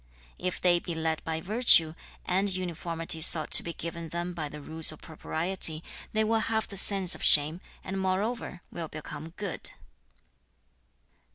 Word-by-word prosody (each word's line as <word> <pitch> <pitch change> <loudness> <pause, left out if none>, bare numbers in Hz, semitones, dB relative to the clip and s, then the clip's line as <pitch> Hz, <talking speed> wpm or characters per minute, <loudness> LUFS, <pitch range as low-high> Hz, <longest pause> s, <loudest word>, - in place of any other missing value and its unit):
2. - - -9
'If 180 - -4
they 175 -1 +3
be 170 -1 -6
led 160 -1 -2
by 160 0 -3
virtue, 180 -5 +5 0.3
and 190 +3 0
uniformity 170 -3 -4
sought 155 -1 +5
to - - +9
be 170 - -6
given 170 0 -7
them 175 +2 -4
by 155 -4 -5
the 150 - -10
rules 160 +2 0
of 155 - -13
propriety, 160 0 -3 0.3
they 220 0 +1
will 225 +1 +1
have 220 0 -2
the 200 - -10
sense 195 -2 +1
of - - -4
shame, 155 +4 +6 0.2
and 190 0 -4
moreover 190 0 -3
will 170 -2 -6
become 155 +1 -9
good.' 200 -5 -3
170 Hz, 165 wpm, -28 LUFS, 160-190 Hz, 0.3 s, to